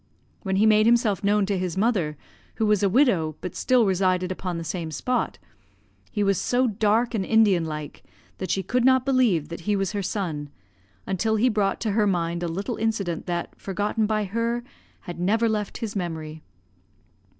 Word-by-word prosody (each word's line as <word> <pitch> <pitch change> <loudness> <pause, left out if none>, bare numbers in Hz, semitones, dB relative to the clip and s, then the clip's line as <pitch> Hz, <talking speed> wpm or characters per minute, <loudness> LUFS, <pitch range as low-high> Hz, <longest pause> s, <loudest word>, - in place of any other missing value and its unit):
"When 190 -2 -2
he 205 +3 +4
made 215 0 +5
himself 230 -4 +2
known 205 0 +3
to 195 -1 -1
his 180 -1 -3
mother, 190 -9 +1 0.4
who 220 - 0
was 210 -2 +3
a 200 - +3
widow, 185 - +2
but 180 - -6
still 250 -3 +3
resided 185 -1 +1
upon 180 -2 -4
the 165 - -4
same 165 -1 -4
spot, 250 +11 -2 0.7
he 210 - 0
was 195 -2 +1
so 250 +1 +2
dark 220 +2 +1
and 210 -4 0
Indian 200 -5 +3
like, 150 -2 -6 0.4
that 185 - -4
she 190 - 0
could 250 +7 0
not 260 0 +4
believe 235 - +2
that 170 - -6
he 205 +5 0
was 195 -2 -1
her 205 -1 -2
son, 170 -7 -3 0.6
until 220 +4 0
he 235 +4 +3
brought 210 -3 0
to 220 - 0
her 210 0 +2
mind 170 -2 -1
a 175 - -1
little 195 +8 -3
incident, 205 -7 -2
that, 175 -1 -3
forgotten 210 +2 -1
by 215 -1 0
her, 230 +4 -2 0.4
had 175 -3 -8
never 220 +6 +2
left 210 -2 -2
his 225 -4 -5
memory. 160 -4 -4
200 Hz, 185 wpm, -25 LUFS, 175-220 Hz, 0.7 s, made